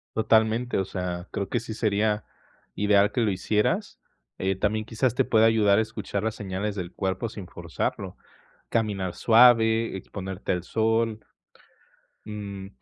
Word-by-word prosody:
Totalmente, 110 +2 +2
o 95 - 0
sea, 90 -1 -4
creo 100 -1 -3
que 120 - 0
sí 115 -1 -7
sería 105 -1 0 0.5
ideal 105 0 +3
que 120 - 0
lo 110 - +2
hicieras, 105 +3 -1 0.4
eh, 95 +1 0
también 105 +3 -1
quizás 115 +1 0
te - - +2
pueda 110 -1 +4
ayudar 105 -3 +4
a - - +4
escuchar 110 -2 -4
las 110 -1 -1
señales 100 +1 -4
del 90 -3 -5
cuerpo 95 +3 -2
sin 100 -4 -9
forzarlo, - - -4 0.5
caminar 100 -5 -1
suave, 115 -2 +5
exponerte 95 0 -5
al 90 -2 -1
sol. 110 +1 0 1.1
Mm, 100 -2 -7
105 Hz, 145 wpm, -26 LUFS, 95-110 Hz, 1.1 s, suave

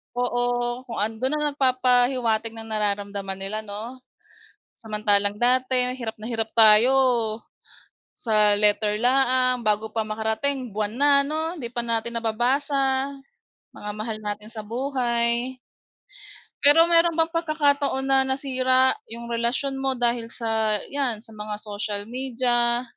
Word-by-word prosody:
oo, 245 0 -1 0.4
kung 230 - -7
andoon, 225 +6 -1 0.2
nagpapahiwatig 250 -4 +1
ng 225 0 -8
nararamdaman 200 -2 -2
nila, 200 +3 -4
'no. 220 +5 -8 0.8
Samantalang 210 -2 0
dati 250 0 +2
hirap 225 -3 -6
na 220 - -7
hirap 225 -1 -2
tayo. 220 +3 +7 1.3
Sa 210 -2 +2
letter 210 0 +1
laang 255 0 +3
bago 215 +1 0
pa 225 - 0
makarating, 220 +5 -2
buwan 210 0 -3
na 290 +1 +4
'no? 320 +3 -4
Hindi 235 -5 -6
pa 240 - -1
natin 230 0 -1
nababasa, 265 +4 0 0.7
mga 210 0 -6
mahal 215 0 -4
natin 210 +1 -6
sa 225 -2 -8
buhay. 240 0 -1 1.1
Pero 325 +4 +7
meron 335 -1 +4
bang 325 0 +2
pagkakataon 290 -4 0
na 270 0 +3
nasira 260 -1 +2 0.2
yung 235 +1 -8
relasyon 235 +4 -1
mo 265 -1 -1
dahil 235 -1 -1
sa 220 -3 0
yan, 265 -6 -1
sa 225 - -15
mga 210 0 -6
social 205 -1 -5
media? 240 -1 0
235 Hz, 125 wpm, -23 LUFS, 215-260 Hz, 1.3 s, tayo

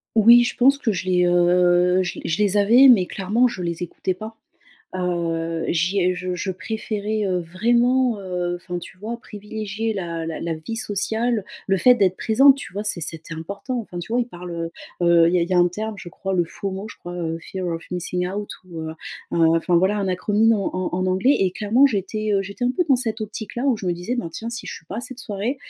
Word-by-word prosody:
Oui. 235 +2 +8
Je - - -2
pense 275 +3 +5
que 240 -5 0
je 185 -2 -3
les, 180 -1 +3
heu, 175 +1 +4
je 175 - -5
les - - -5
je 165 +6 0
les 205 -1 +2
avais, 235 +7 +7
mais, 210 -8 +6
clairement, 210 +8 +1
je 190 -7 -5
les 170 0 -3
écoutais 185 +2 -3
pas. 215 +4 -9 0.6
Heu, 165 -2 -2
j’y 175 +4 +1
ai 180 0 +2
je 180 0 -3
je 190 +2 -3
préférais, 215 +2 -3
heu, 185 -1 0
vraiment, 235 +6 +2
heu, 180 -2 -2
enfin, 175 0 -5
tu 185 +2 -11
vois, 225 +4 -5
privilégier 215 +1 -5
la 170 -4 -4
la 165 - -4
la 165 0 -3
vie 160 +9 -6
sociale, 220 0 -1 0.2
le 195 0 +2
fait 250 +7 +6
d'être 190 -5 +2
présente, 270 +5 +5
tu 230 - -9
vois? 205 +1 -3
C'e 200 -4 -2
c’était 160 +1 -6
important, 200 +10 -5
enfin, 180 -5 -8
tu 175 +6 -6
vois, 245 - +2
on - - +1
parle, 180 -6 -9 0.5
heu, 175 - +2
heu, 170 -1 +6
il - - -1
y - - +4
a 170 - +2
il 170 - -2
y 185 - 0
a - - +4
un 175 0 +5
terme, 215 +4 -5
je 175 - -9
crois, 195 +2 -4
le 175 - +2
FOMO, 195 +4 -6
je - - -12
crois, 175 0 -8
heu 165 -2 -3
fear 185 +1 -5
of 165 0 -3
missing 180 0 -2
out 205 +2 -5 0.2
ou, 165 -2 -7
heu, 160 - -5 0.4
heu, - - 0 0.2
enfin, 170 +1 +1
voilà, 190 +4 +3
un 195 -2 -1
acronyme 210 +5 +2
en 200 -4 -1
en - - -13
en 185 +1 0
anglais. 190 +10 +3
Et 185 -2 +2
clairement, 225 +8 +4
j'étais, 215 -1 -2
heu, 195 - +2
j'étais 200 +6 -3
un 250 - +2
peu 360 - +2
dans 270 -3 +4
cette 225 -3 -3
optique 215 0 -7
là, 245 - -2
où 255 -5 +2
je 190 - -6
me 175 - +2
disais: 180 +9 -3
«Bah, 240 - -3
tiens, 225 +7 -6
si 235 - -6
je - - -5
suis - - -12
pas 210 - -6
à - - -2
cette 250 +1 -8
soirée, 215 +5 -3
195 Hz, 250 wpm, -22 LUFS, 175-220 Hz, 0.6 s, Oui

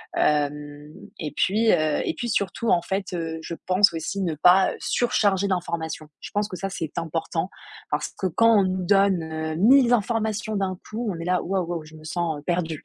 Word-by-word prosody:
Hem 145 0 -1 0.3
et 150 -2 -4
puis, 220 +4 +3
heu 155 -3 +2
et - - -1
puis 240 - -4
surtout, 200 +3 -1
en 170 -1 +3
fait, 190 0 -3
heu, 165 -1 -3
je 170 - -6
pense 185 +1 +5
aussi 165 +5 -3
ne 165 -4 -1
pas, 180 +5 +5
heu, - - -10
surcharger 200 -5 +1
d'informations. 170 -4 -3
Je - - -7
pense 205 0 0
que 185 -4 -7
ça, 195 +3 -3
c'est 165 -5 -5
important, 165 +2 -3 0.4
parce - - -1
que 190 - +1
quand 230 +5 +4
on - - +4
nous 185 -1 -2
donne, 195 -3 +3
heu, 160 0 -4
1000 245 +6 +5
informations 220 -1 0
d'un 190 -2 -1
coup, 225 0 -3
on 170 - -6
est 165 - -5
là,: 180 0 +1
«Waouh, 185 -1 -1
waouh, 170 -2 -4
je 155 +1 -14
me 155 - -13
sens, 160 -1 -2
heu, - - -15
perdue». 165 -3 -2
180 Hz, 210 wpm, -24 LUFS, 160-200 Hz, 0.4 s, pense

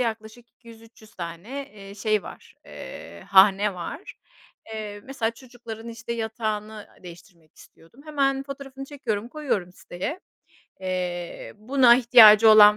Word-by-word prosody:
yaklaşık 230 0 -4
200-300 225 -1 -18
tane, 185 +11 -7
eee, 200 -1 -11
şey 215 0 0
var, - - -12
eee, 85 +1 -10
hane 195 +1 +5
var. 180 - -8 0.6
Eee, 210 -1 -6
mesela 250 -4 -2
çocukların 230 -2 -11
işte 235 0 -7
yatağını, 220 -2 -3
aaa, 210 -1 -14
değiştirmek 175 -2 -15
istiyordum. 165 +11 -19
Hemen 275 -3 0
fotoğrafını 270 -1 -9
çekiyorum, 240 -6 -4
koyuyorum 250 - -3
siteye. 190 - -6 0.6
Eee, 180 -2 -4
buna 240 +2 +5
ihtiyacı 225 -3 +8
olan 210 -1 +8
220 Hz, 120 wpm, -24 LUFS, 195-245 Hz, 0.6 s, ihtiyacı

